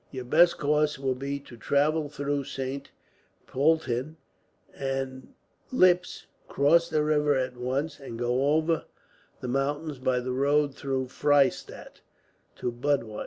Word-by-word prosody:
"Your 130 -2 -7
best 170 +7 +4
course 150 0 +1
will 135 -1 -1
be 140 +2 -4
to 125 - -13
travel 145 +5 +1
through 145 -1 -2
Saint 135 +1 -5 0.6
Poelten 145 0 0 0.6
and 135 -1 -4 0.4
Ips, 180 -7 +3 0.2
cross 165 +4 +3
the 155 -1 +1
river 150 -1 +2
at 130 -1 -1
once, 135 +5 -3
and 130 -4 -8
go 125 +5 +1
over 160 +1 +1 0.6
the - - -4
mountains 145 +3 -2
by 130 -1 +1
the 125 +1 -4
road 140 +2 +2
through 135 -1 -2
Freystadt 140 +1 0 0.5
to 120 - -3
Budweis. 120 -3 -1
140 Hz, 130 wpm, -27 LUFS, 130-150 Hz, 0.6 s, best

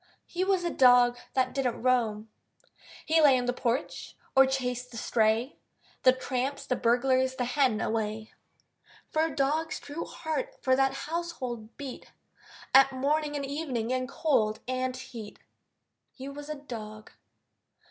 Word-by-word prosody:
He 360 +1 -2
was 380 -2 +1
a 345 - -1
dog 245 -1 +6 0.2
That 255 -1 +1
didn't 255 -4 -1
roam. 225 -4 +1 0.8
He 320 0 +4
lay 280 -4 +6
on 250 - -1
the 245 - 0
porch 250 +2 -3 0.2
or 265 0 +7
chased 250 -2 -2
the 230 - -9
stray 225 +3 +1 0.4
The 255 - +7
tramps, 260 +1 -3
the 250 - 0
burglar, 255 +3 +2
the 260 -1 -3
hen, 250 -3 +2
away; 220 0 -2 0.8
For 310 - +2
a 320 -4 -4
dog's 305 +3 0
true 290 +3 -6
heart 470 +11 -4
for 260 0 +4
that 270 0 +2
household 265 -9 -5
beat 275 -3 -8 0.6
At 270 +1 +7
morning 295 +3 0
and 280 -1 -2
evening, 270 -5 -3
in 255 0 -1
cold 260 -8 +1
and 255 0 -2
heat. 235 -5 -9 0.7
He 265 0 -9
was 290 +1 -8
a 305 - -3
dog. 215 -6 -9
260 Hz, 145 wpm, -28 LUFS, 245-285 Hz, 0.8 s, or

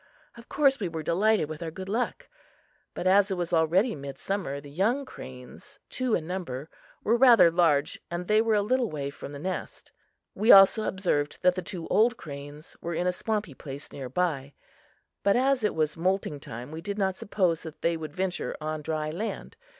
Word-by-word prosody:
Of 235 0 -14
course, 275 -2 +3
we 195 - -1
were 160 -1 -5
delighted 200 +1 +2
with 155 +1 -7
our 165 - -3
good 185 +4 -8
luck. 245 - -2 0.7
But, - - -4
as 195 +2 +5
it 190 - -2
was 175 -1 -3
already 170 +8 +3
midsummer, 140 +2 -4
the 145 0 -12
young 225 - +1
cranes 125 - -11
two 255 -3 0
in 160 - -3
number 160 -6 -5 0.3
were 225 - +3
rather 240 -8 +7
large 160 -4 +2
and 175 +1 -4
they 215 +1 +4
were 225 -1 +2
a 205 - +2
little 250 +1 +1
way 140 -2 -4
from 140 - -9
the 145 - -7
nest; 185 +6 -5 0.4
we 215 +5 +4
also 195 +3 +8
observed 150 -7 -1
that 180 0 +5
the 185 - -4
two 175 -3 -7
old 225 +5 +3
cranes 145 -3 -10
were 170 0 -3
in 175 - -1
a 180 - +3
swampy 210 -4 -2
place 140 +2 -9
near 135 -3 -7
by; 140 -3 -1 0.7
but, 200 - +3
as 260 0 +2
it 210 - +1
was 155 -1 0
moulting 180 -3 -1
time, 120 +1 -8
we 160 +1 -6
did 200 +3 -4
not 190 -2 0
suppose 185 -5 0
that 160 -1 -10
they 170 0 +2
would 160 0 -7
venture 190 -1 -2
on 155 0 -3
dry 155 0 -2
land. 215 - -5
180 Hz, 195 wpm, -27 LUFS, 155-210 Hz, 0.7 s, also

